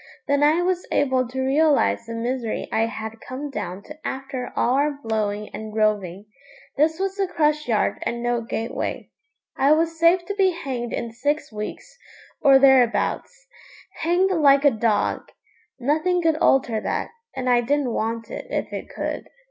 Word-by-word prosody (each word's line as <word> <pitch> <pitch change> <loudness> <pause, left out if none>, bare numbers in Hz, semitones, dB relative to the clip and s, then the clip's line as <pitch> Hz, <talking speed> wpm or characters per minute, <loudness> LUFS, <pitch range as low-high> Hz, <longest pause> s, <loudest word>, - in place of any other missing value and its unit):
Then 285 0 +2
I 310 +4 +4
was 365 0 -1
able 260 -3 +2
to 260 +2 -4
realise 285 -4 +2
the 230 - -5
misery 235 0 -3
I 225 +1 +2
had 220 0 -7
come 275 +3 -6
down 200 -4 -5
to 300 - -10
after 265 -2 -5
all 245 - +2
our 285 +1 +1
blowing 210 -2 -2
and 215 0 -8
roving. 205 -3 0 0.5
This 315 +2 +2
was 390 +1 -2
the 390 -1 +1
crush 300 -4 0
yard 220 -3 +1
and 235 0 -3
no 240 -1 0
gateway. 230 0 -4 0.4
I 280 +3 +4
was 325 +1 0
safe 345 +2 +4
to 405 - -3
be 385 -2 +2
hanged 255 -7 -4
in 230 - -3
six 285 +6 -2
weeks, - - -7 0.4
or 275 -1 +7
thereabouts 270 - +2 0.5
hanged 350 +4 +2
like 285 -5 +4
a 285 - +7
dog! 220 -2 0 0.5
Nothing 315 +7 +1
could 325 -1 +2
alter 240 -7 +2
that, - - -2 0.2
and 260 -1 -3
I 245 -1 +4
didn't 270 0 0
want 225 +1 -3
it - - -6
if - - -3
it - - -6
could. - - -4
265 Hz, 165 wpm, -23 LUFS, 230-310 Hz, 0.5 s, or